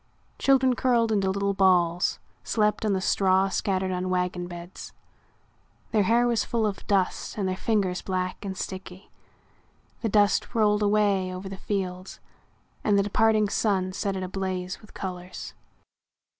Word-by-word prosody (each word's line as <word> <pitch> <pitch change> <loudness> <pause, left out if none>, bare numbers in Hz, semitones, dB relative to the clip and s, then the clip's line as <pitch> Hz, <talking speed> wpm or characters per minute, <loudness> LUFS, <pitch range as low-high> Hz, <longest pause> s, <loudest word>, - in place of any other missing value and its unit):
Children, 265 -2 +4
curled 235 -2 +2
into 195 -3 +1
little 200 +1 0
balls, 180 -2 +3 0.3
slept 210 0 +1
on 205 - +2
the 190 - 0
straw 190 0 +3
scattered 190 -1 -1
on 185 0 -2
wagon 180 -1 -1
beds. 175 +1 -9 1.0
Their 215 - +3
hair 230 +5 +3
was 235 -2 +1
full 230 -2 0
of 205 -2 -4
dust 195 0 0
and 200 -2 0
their 185 - -1
fingers 190 -3 0
black 185 0 -3
and 190 -2 -5
sticky. 185 0 -7 0.9
The 225 - 0
dust 205 +3 +2
rolled 210 -2 +3
away 205 -3 +2
over 185 +1 -6
the 195 - -6
fields 185 -2 -4 0.6
and 205 -2 +3
the 200 - +3
departing 215 +1 +3
sun 190 -3 0
set 195 +1 -2
it 190 - -3
ablaze 185 -1 -4
with 215 - -17
colors. 185 -2 -6
195 Hz, 150 wpm, -26 LUFS, 185-210 Hz, 1.0 s, Children